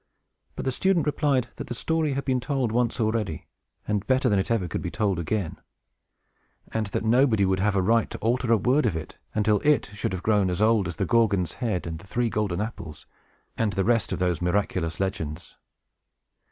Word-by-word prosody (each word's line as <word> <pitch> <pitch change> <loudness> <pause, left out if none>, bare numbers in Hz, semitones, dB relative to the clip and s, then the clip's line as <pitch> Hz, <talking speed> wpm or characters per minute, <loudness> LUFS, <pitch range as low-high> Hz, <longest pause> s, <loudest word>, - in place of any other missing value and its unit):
But - - -5
the 130 - +1
student 185 +4 +1
replied 140 -4 +1
that - - -6
the 120 - -4
story 160 +1 0
had 140 +1 -3
been 130 -2 +1
told 130 -3 -1
once 120 +1 0
already, 110 -7 -1 0.4
and 105 -1 -1
better 130 -1 +3
than 100 -2 +3
it 95 - -2
ever 110 -6 +1
could - - -3
be 90 - -3
told 100 -3 0
again; 85 0 -2 1.1
and 110 -1 -1
that 100 - -2
nobody 115 -3 +4
would 95 0 +1
have 100 +1 +1
a 95 - +2
right 115 +3 +2
to - - -6
alter 120 +1 0
a 115 - +6
word 125 +6 +2
of 100 - -1
it, 80 - -7 0.2
until 105 -1 +2
it 150 -8 +2
should 105 - -3
have 90 -1 -4
grown 105 -4 +3
as 90 - -2
old 110 -3 +3
as 85 - -5
"The - - -1
Gorgon's 100 -7 +2
Head," 110 -7 -1
and 80 -1 -5
"The 90 - -15
Three 120 +2 0
Golden 100 -3 -1
Apples," 85 -8 -6 0.5
and 110 -3 0
the 95 - 0
rest 115 0 +2
of - - -1
those 90 -2 0
miraculous 90 -2 -1
legends. 80 -4 -4
105 Hz, 205 wpm, -26 LUFS, 95-120 Hz, 1.1 s, a